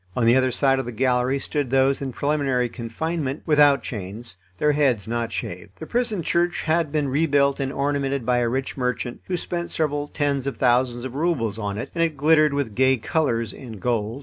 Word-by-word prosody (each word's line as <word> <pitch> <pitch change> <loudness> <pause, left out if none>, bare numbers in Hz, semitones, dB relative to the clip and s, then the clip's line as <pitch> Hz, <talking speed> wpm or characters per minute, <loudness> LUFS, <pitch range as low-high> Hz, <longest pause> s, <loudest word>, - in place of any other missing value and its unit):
On 120 - +1
the 115 +2 +5
other 130 0 +3
side 135 +1 +2
of 130 - -3
the 120 - -5
gallery 125 +2 +1
stood 145 -1 -2
those 135 +1 +2
in 135 -1 -3
preliminary 140 -3 0
confinement, 135 +5 -4
without 145 -3 +4
chains, 105 0 -6 0.2
their 150 +6 +3
heads 135 -9 +1
not 115 0 -2
shaved. 90 +2 -6
The - - -7
prison 235 -7 -1
church 175 +2 0
had 160 -1 +1
been 150 -2 0
rebuilt 140 0 +2
and 135 -1 -1
ornamented 140 -2 -1
by 125 0 +2
a 120 -1 +1
rich 130 +2 -2
merchant, 125 -2 -3
who 180 - -2
spent 175 0 -4
several 145 -2 -1
tens 140 -2 -1
of 140 - -3
thousands 120 -1 +2
of 130 - -6
roubles 135 - -1
on 100 -1 -3
it, 115 - -5
and 165 - +1
it 160 -3 -1
glittered 155 +1 +4
with 140 -7 -2
gay 130 +3 +3
colours 115 -4 -1
and 115 -6 -10
gold. 115 +2 -1
135 Hz, 205 wpm, -23 LUFS, 120-150 Hz, 0.2 s, the